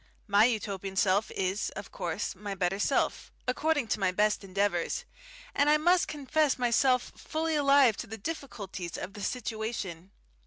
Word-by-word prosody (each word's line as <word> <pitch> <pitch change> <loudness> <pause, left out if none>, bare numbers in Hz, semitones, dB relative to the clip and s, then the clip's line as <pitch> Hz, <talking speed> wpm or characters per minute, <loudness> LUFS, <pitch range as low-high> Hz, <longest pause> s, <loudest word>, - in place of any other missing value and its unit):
My 205 +1 +5
Utopian 200 -5 -2
self 195 +1 +2
is, 190 +2 -1
of - - -7
course, - - -3
my 205 -1 -6
better 190 +1 0
self 265 +6 0 0.2
according 290 0 +1
to 215 - 0
my 190 -2 +2
best 210 +2 +1
endeavours 195 - -1 0.5
and 285 +1 +3
I 300 - +6
must 350 +3 +3
confess 295 0 +1
myself 250 +1 +2
fully 320 +1 -2
alive 280 -6 +5
to 240 - -6
the 225 0 -7
difficulties 200 - -6
of 195 - -6
the 205 - -8
situation. 215 -6 -4
220 Hz, 155 wpm, -29 LUFS, 195-280 Hz, 0.5 s, I